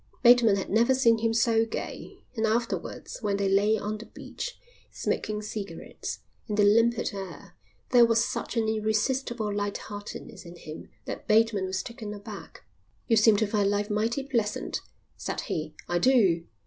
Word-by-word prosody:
Bateman 240 -4 +7
had 195 - -3
never 235 +5 +4
seen 230 -3 +4
him 225 0 +1
so 225 0 +3
gay, 225 - -6
and 220 -1 +1
afterwards 230 +2 -2
when 205 -2 0
they 200 -1 0
lay 205 +3 +3
on 210 +1 -4
the 225 - -10
beach, - - -7 0.3
smoking 215 0 -2
cigarettes, 210 -1 -6 0.3
in 210 - -2
the 210 - +4
limpid 230 +3 +3
air, 190 -3 -8 0.4
there 245 -2 +7
was 230 0 +3
such - - -4
an 225 -1 +2
irresistible 220 +1 0
light 205 0 -2
heartedness 205 -1 -8
in 170 0 -11
him 155 -2 -10 0.2
that - - -6
Bateman 215 -2 +3
was 185 0 -2
taken 225 -3 -7
aback. 205 0 -10 0.4
"You 230 - +4
seem 215 -1 +6
to 220 - +2
find 205 -1 +1
life 205 +1 -1
mighty 225 +6 0
pleasant," 235 -7 -1 0.4
said - - -3
he. - - -4
"I 175 0 +1
do." 190 -8 +3
215 Hz, 165 wpm, -27 LUFS, 205-230 Hz, 0.4 s, Bateman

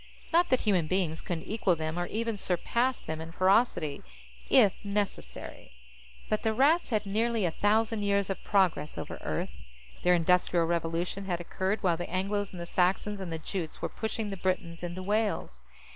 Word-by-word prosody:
Not 345 +1 +5
that 255 - +3
human 185 -7 +2
beings 175 -3 0
couldn't 170 -3 -4
equal 205 -5 +1
them 160 +1 -3
or 175 - -1
even 230 0 -2
surpass 235 +7 0
them 160 0 -5
in 165 0 -7
ferocity, 185 -5 +2 0.5
if 210 -7 +6
necessary. 200 - -4 0.5
But 215 - 0
the 220 -1 0
Rats 300 +8 +4
had 215 -3 0
nearly 220 +1 +1
a 170 - +1
thousand 220 +3 +2
years 200 -1 +1
of 195 - -5
progress 180 -7 +1
over - - -6
Earth. - - -2 0.5
Their 180 0 +5
Industrial 175 0 +3
Revolution 170 +3 -1
had 175 -3 -1
occurred 190 +4 -2
while 175 -3 +3
the 175 - -5
Angles 200 +2 -1
and 180 - -8
the 170 - -4
Saxons 190 +4 +1
and 185 -3 -5
the 165 - -2
Jutes 160 0 -5
were - - -2
pushing 220 -1 -3
the 195 - -4
Britons 180 -2 -2
into 175 +1 -5
Wales. 205 - -1
190 Hz, 175 wpm, -29 LUFS, 170-210 Hz, 0.5 s, if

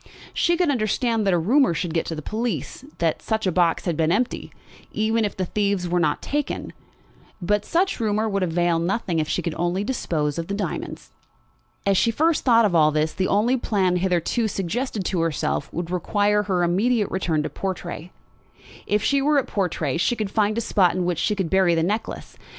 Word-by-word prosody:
She 345 0 +2
could 350 -4 +2
understand 225 -2 0
that 195 - +3
a - - +3
rumour 230 - +3
should 165 0 -2
get 165 - -1
to 165 - -3
the 155 - -7
police 230 - -3
that 165 -2 0
the 220 -4 -1
box 170 -1 +1
had 170 -3 0
been 160 +1 +1
empty, 235 +6 -1 0.4
even 220 +1 +1
if 205 - -3
the 185 - -1
thieves 200 -1 -1
were 175 +1 +1
not 155 -3 0
taken; 290 0 -3 0.7
but 210 +3 0
such 370 0 0
rumour 215 -1 0
would 200 -2 -1
avail 175 -1 +1
nothing 175 -1 -1
if 155 0 -1
she 180 - -1
could 170 - -2
only 175 +3 0
dispose 160 - -2
of 165 - -4
the 200 - -3
diamonds. 205 - -5 0.7
As 195 -1 +3
she 230 - +3
first 315 +7 +1
thought 230 -3 +5
of 200 - +1
all 155 -2 +5
this, 155 +1 0
the 185 - -1
only 230 +6 +2
plan 190 -6 +1
hitherto 185 +5 0
suggested 205 +2 -3
to 180 -2 0
herself 160 -3 -1
would 175 0 -4
require 205 +3 +1
her 190 -4 0
immediate 205 +5 +1
return 165 -5 0
to - - -3
Portray. 180 -2 -5 0.8
If 210 0 +1
she 280 -1 +2
were 295 +1 +3
at 275 - +2
Portray 165 -8 -1
she 175 +8 +1
could 215 -4 -3
find 215 0 +1
a - - +1
spot 185 -5 +2
in 185 -1 -1
which 175 -3 -1
she 210 - +1
could 190 -5 -2
bury 190 -3 +4
the 165 - +1
necklace. 210 +6 -3
195 Hz, 200 wpm, -23 LUFS, 170-220 Hz, 0.8 s, thought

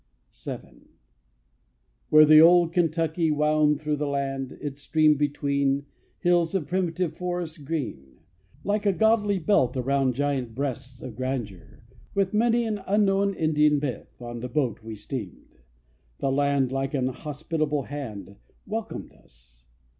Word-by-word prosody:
VII. - - -9 1.1
Where 155 0 +8
the 155 0 +8
old 170 0 +6
Kentucky 165 -1 +1
wound 150 0 +2
Through 150 -1 -1
the 150 0 -2
land, 135 -1 -2
its 145 -1 -6
stream 155 +1 +3
between 140 -1 0 0.4
Hills 175 -1 +2
of 180 -6 0
primitive 180 -2 -1
forest 175 -4 -4
green, 90 - -5 0.5
Like 205 +1 0
a 200 - +4
goodly 215 -1 +2
belt 155 - +2
around 135 0 +1
Giant 135 -4 -1
breasts 130 -1 -5
of 120 - -7
grandeur; 120 -8 -5 0.3
with 195 -1 +1
Many 235 +2 +3
an 210 -3 -2
unknown 200 0 +2
Indian 150 -2 +3
myth, 140 -6 -5
On 120 -1 -7
the 125 +2 -5
boat 130 -4 -1
we 110 0 -7
steamed. 105 - -8 0.6
The 135 - -1
land 140 -2 +1
Like 135 +1 -2
an 130 -2 +1
hospitable 150 +1 -3
hand 110 -8 -7 0.3
Welcomed 220 +2 -5
us. - - -25
145 Hz, 135 wpm, -26 LUFS, 130-170 Hz, 1.1 s, Where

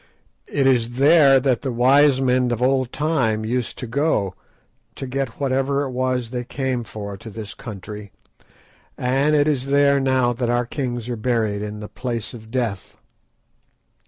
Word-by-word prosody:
It 140 -2 0
is 120 -3 +2
there 140 0 +6
that 130 -2 +1
the 135 - -2
wise 130 +3 +4
men 125 -1 +2
of 120 - -1
old 130 0 +1
time 125 -9 0
used 125 +2 -2
to 125 - -5
go 120 - 0 0.6
to - - -5
get 135 -2 -3
whatever 140 +1 0
it 135 - -4
was 125 -2 -1
they 125 -1 -3
came 130 -1 -2
for 100 0 -7
to 110 - -10
this 105 -1 -7
country, 105 -1 -9 0.9
and 135 +4 +2
it 145 0 +3
is 135 -3 0
there 140 0 +4
now 130 -2 +2
that 120 0 -2
our 120 0 +1
kings 120 -2 -4
are 120 - -2
buried 110 -3 0
in 105 0 -6
the 105 - -6
Place 115 -3 -5
of 110 -2 -11
Death." 115 -6 -3
125 Hz, 165 wpm, -22 LUFS, 115-135 Hz, 0.9 s, there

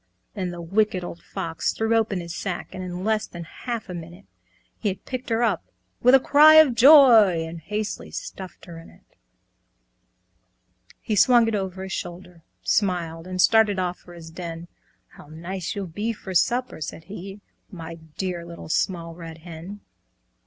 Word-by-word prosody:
Then 190 -4 -3
the 175 -1 -7
Wicked 195 +1 0
Old 175 0 -8
Fox 165 -1 -3
threw 225 +1 0
open 215 -5 +1
his 170 0 -7
sack, 185 -3 -4
And 185 -1 -6
in 180 0 -5
less 215 0 0
than 170 -1 -8
half 235 +7 -6
a 180 - -7
minute, 175 +3 -9 0.5
He 210 - 0
had 185 - -7
picked 255 -1 -5
her 230 +1 +1
up 210 -7 +1 0.4
with 250 +2 +7
a - - +7
cry 300 +4 +7
of 315 -5 +7
joy, 230 - +7
And 165 +1 -8
hastily 210 +5 -4
stuffed 190 -2 -8
her 170 -2 -10
in 165 - -14
it. - - -22 2.0
He 215 - -2
swung 235 +3 +5
it 225 - -1
over 190 -2 -3
his 190 - -7
shoulder, 175 -1 -7 0.2
smiled, 175 -4 0
And 185 0 -5
started 220 0 +4
off 180 -1 -2
for 175 - -14
his 165 -1 -11
den; 170 0 -7 0.4
"How - - -16
nice 170 +6 -5
you'll 200 -1 -3
be 205 +7 -3
for 190 -3 -8
supper!" 245 +2 +1
said 155 - -6
he, 195 +3 -9 0.3
"My 165 -4 -8 0.2
dear 180 -3 -3
Little 170 -2 -10
Small 165 0 -1
Red 165 -1 -9
Hen!" 175 +5 -9
185 Hz, 175 wpm, -24 LUFS, 170-215 Hz, 2.0 s, with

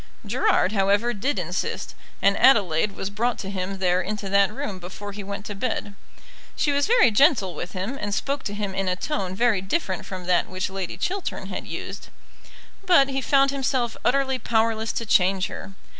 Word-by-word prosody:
Gerard, 415 - +2
however, 205 +3 +2
did 240 +5 -1
insist, 180 +1 -3 0.3
and 200 0 +5
Adelaide 200 -6 +4
was 195 - -4
brought 235 +4 0
to 195 - -5
him 190 0 -3
there 180 -1 +2
into 200 +1 -4
that 200 +1 +4
room 200 -3 -5
before 190 +3 -8
he 205 0 -7
went 200 +1 -6
to 205 - -5
bed. 205 -1 -3 0.6
She 295 - +1
was 285 0 +1
very 465 - +5
gentle 210 - +4
with 175 +3 -6
him, 205 +9 -4
and 205 - -2
spoke 275 +7 -1
to 205 - -3
him 205 -2 -3
in 195 0 -2
a 180 - +1
tone 190 -4 -3
very 225 -3 +2
different 190 - -2
from 185 -2 -6
that 180 -1 +2
which 185 0 -3
Lady 190 -2 -4
Chiltern 395 -1 -3
had - - -5
used; - - -6 0.8
but 345 -8 +5
he 270 0 -1
found 275 +1 +3
himself 260 -3 -1
utterly 265 0 +1
powerless 225 -1 +1
to 230 - -3
change 190 -2 +3
her. 195 - -7
205 Hz, 190 wpm, -24 LUFS, 190-255 Hz, 0.8 s, and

